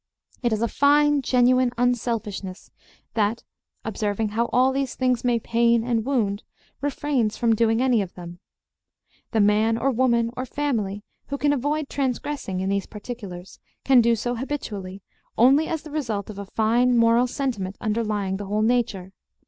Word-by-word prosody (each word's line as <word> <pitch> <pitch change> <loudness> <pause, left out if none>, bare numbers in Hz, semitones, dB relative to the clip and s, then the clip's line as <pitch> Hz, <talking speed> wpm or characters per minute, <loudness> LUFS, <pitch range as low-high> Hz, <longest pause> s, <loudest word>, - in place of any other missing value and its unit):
It 240 -2 +1
is 220 +1 0
a - - +2
fine 290 +2 +3
genuine 255 0 +3
unselfishness 225 -5 -2 0.4
that, 220 +1 0 0.4
observing 210 0 -1
how 225 +3 0
all 255 +1 +4
these 270 -2 -2
things 255 -2 0
may 245 -1 +2
pain 235 0 +2
and 230 -2 0
wound, 220 -6 0 0.4
refrains 275 -5 -1
from 230 -1 +2
doing 225 +2 +2
any 250 -4 +3
of 190 -3 -6
them. 175 -1 -9 0.9
The 220 - +1
man 215 +2 +3
or 270 +3 +1
woman 235 -2 +2
or 255 - -3
family 220 -9 -2 0.2
who 280 - -3
can 290 +1 +2
avoid 290 +2 -1
transgressing 265 -8 -3
in 190 - -1
these 200 0 -1
particulars 205 -5 -9 0.3
can 265 -2 +6
do 235 0 +3
so 240 +2 -2
habitually 205 -8 -5 0.3
only 270 +7 +5
as 320 -2 -3
the 310 - -10
result 225 -9 -3
of 200 - -10
a 200 - -5
fine 240 +4 +2
moral 230 +2 +4
sentiment 230 -8 -3
underlying 210 -3 -1
the 200 0 -6
whole 210 +2 0
nature. 220 -6 0
235 Hz, 160 wpm, -24 LUFS, 210-255 Hz, 0.9 s, can